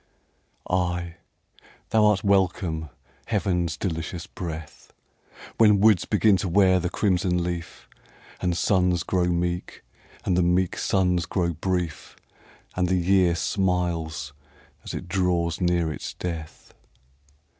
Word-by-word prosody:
Ay, 90 -1 -1 0.7
thou 110 -1 +4
art 105 -2 +2
welcome, 90 -5 +1 0.4
heaven's 90 -7 0
delicious 85 -1 -4
breath, 80 -3 -8 0.7
When 105 -3 +6
woods 105 -3 +4
begin 105 -1 +3
to 95 - -2
wear 95 0 +4
the 90 0 -2
crimson 90 -3 +1
leaf, 85 -2 -5 0.5
And 90 -2 0
suns 90 -3 +2
grow 90 -1 0
meek, 85 0 -2 0.4
and 90 - +1
the 90 - +3
meek 90 +1 +1
suns 90 -3 +1
grow 85 -3 0
brief, 85 -2 -3 0.6
And 90 0 +1
the 95 +1 +1
year 90 -1 +3
smiles 85 -6 -1 0.5
as - - -6
it - - -6
draws 90 -2 0
near 85 -3 +1
its - - -7
death. 80 -3 -7
90 Hz, 120 wpm, -25 LUFS, 85-95 Hz, 0.7 s, When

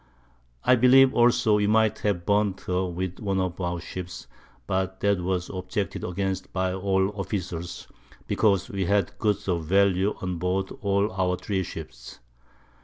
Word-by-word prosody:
I - - +5
believe 130 +2 +6
also 120 -2 +4
we 105 0 +1
might 110 0 +3
have 95 -5 -1
burnt 100 -2 +1
her 90 +1 -1
with 90 +1 -4
one 100 -2 -1
of 95 -1 -2
our 90 -1 -2
Ships, 90 +1 -7 0.4
but 95 0 -2
that 100 -2 +2
was 90 0 -2
objected 95 +2 -3
against 95 +1 -3
by 95 -1 -1
all 95 0 +1
the 100 - -3
Officers, 90 -4 -5 0.4
because 100 -4 +2
we 95 -1 -2
had 100 -1 0
Goods 105 -3 0
of 85 -4 -1
Value 95 +2 +2
on 90 -2 -3
board 95 +2 -1
all 100 +1 +1
our 90 -1 0
3 95 +1 -2
Ships. - - -8
95 Hz, 160 wpm, -26 LUFS, 90-100 Hz, 0.4 s, believe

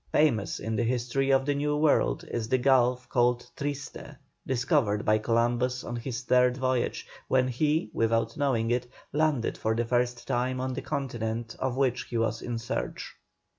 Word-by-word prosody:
Famous 125 -10 +2
in 110 +1 -3
the 120 - +1
history 125 +3 0
of 135 0 +3
the 145 - +1
New 150 +1 0
World 150 -1 +2
is 115 -2 -2
the 130 - +3
gulf 125 -1 +3
called 120 0 +2
"Triste," 140 0 -5 0.3
discovered 125 - +1
by 110 0 +4
Columbus 120 +3 +1
on 120 - -5
his 120 +2 -4
third 125 0 +3
voyage, 130 -2 -1 0.2
when 130 -1 +3
he, 150 -1 0
without 115 0 +1
knowing 125 -6 +1
it, 120 0 0 0.3
landed 150 -5 +1
for 110 0 0
the 120 +1 0
first 120 0 0
time 125 +1 0
on 130 0 -2
the - - -4
Continent 115 -4 -3
of 130 -1 -1
which 130 -2 +1
he 120 - -4
was 115 -1 0
in 120 -1 -3
search. 115 - -4
125 Hz, 170 wpm, -28 LUFS, 115-130 Hz, 0.3 s, by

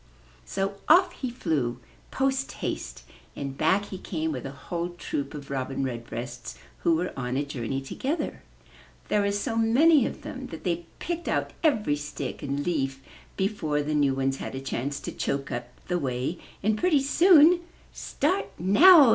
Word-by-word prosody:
So 195 - -2
off 355 +3 +7
he 260 -6 -4
flew, 140 - -1 0.3
post 270 0 0
haste, - - -4 0.3
and 140 -1 -4
back 190 +8 +2
he 190 -2 -7
came 160 -4 -2
with 130 -2 -4
a - - -6
whole 170 +5 -4
troop 145 -4 -4
of 140 -1 -8
Robin 135 0 -2
Redbreasts 120 0 -5 0.2
who 165 - +3
were 180 +3 -2
on 125 -1 -2
a 145 - 0
journey 135 -1 -3
together. 285 - -3 0.7
There 210 - +3
were 200 0 +1
so 205 +4 -1
many 260 +5 +5
of - - -8
them 260 0 -6
that - - -9
they 170 -2 -1
picked 345 0 -4
out - - 0
every 215 - +2
stick 145 -2 -5
and 140 0 -2
leaf 135 -5 -1 0.3
before 160 -7 0
the 150 +1 -2
new 140 -3 +3
ones 135 0 0
had - - -6
a - - -3
chance 135 +1 -3
to - - -5
choke 140 0 -2
up 120 0 -3 0.2
the 180 0 0
way 130 +4 -2 0.2
and 215 +1 +3
pretty 310 -7 +3
soon, 335 +3 +7 0.3
''Start 360 +8 0
now!' 280 - +8
165 Hz, 170 wpm, -27 LUFS, -, 0.7 s, now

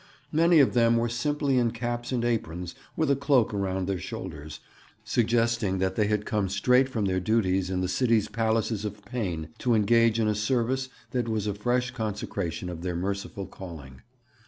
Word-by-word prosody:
Many 165 +2 +4
of 140 - +5
them 115 -1 +4
were 115 0 +1
simply 135 +2 +1
in 120 -1 +2
caps 120 +1 -4
and 120 -2 0
aprons 90 -7 -2 0.2
with 155 -3 +2
a - - +4
cloak 135 -5 +2
around 95 -2 -1
their 95 -2 -1
shoulders, 80 -4 -7 0.4
suggesting 115 -4 +1
that 95 0 0
they 105 -2 +2
had 105 0 0
come 105 -3 0
straight 125 +7 +3
from 110 -5 -1
their 95 -1 +1
duties 95 -2 +1
in 90 -1 -1
the 90 - 0
city's 110 +2 +2
palaces 110 -1 0
of 105 -1 -6
pain 90 - -3
to 120 -2 +2
engage 115 +1 +4
in 110 - +2
a 105 - +2
service 125 +4 0 0.2
that 120 -2 -1
was 110 -2 -1
a 105 - -1
fresh 125 +4 0
consecration 100 -5 -3
of 85 -2 -6
their 90 -1 -3
merciful 100 +2 -3
calling. 80 -9 -10
110 Hz, 180 wpm, -27 LUFS, 95-120 Hz, 0.4 s, of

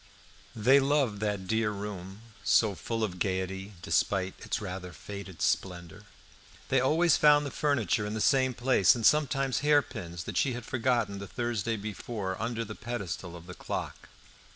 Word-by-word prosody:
How 110 - -7
they 135 +4 +7
loved 135 -6 +1
that 105 -2 -2
dear 110 +2 +1
room, 100 -1 -6 0.2
so 110 -1 +4
full 115 +3 -3
of 90 -4 -3
gaiety, 95 +2 -2
despite 95 +3 +1
its - - -3
rather 90 -3 -6
faded 95 +2 -7
splendour! 85 -3 -2 0.6
They 135 - +4
always 155 +6 +3
found 150 -1 +5
the 140 - -4
furniture 120 - 0
in 105 - -4
the - - -2
same 130 +1 +3
place, 120 -6 +4
and 115 -2 -2
sometimes 135 -3 +3
hairpins, 125 - 0
that - - -5
she 135 - +2
had 120 -1 -6
forgotten 120 -6 0
the 100 - -7
Thursday 115 -2 -2
before, 105 -1 -4
under 115 0 -2
the 110 - -7
pedestal 100 -7 -5
of 85 -1 -11
the 90 - -9
clock. - - -5
110 Hz, 165 wpm, -29 LUFS, 95-125 Hz, 0.6 s, they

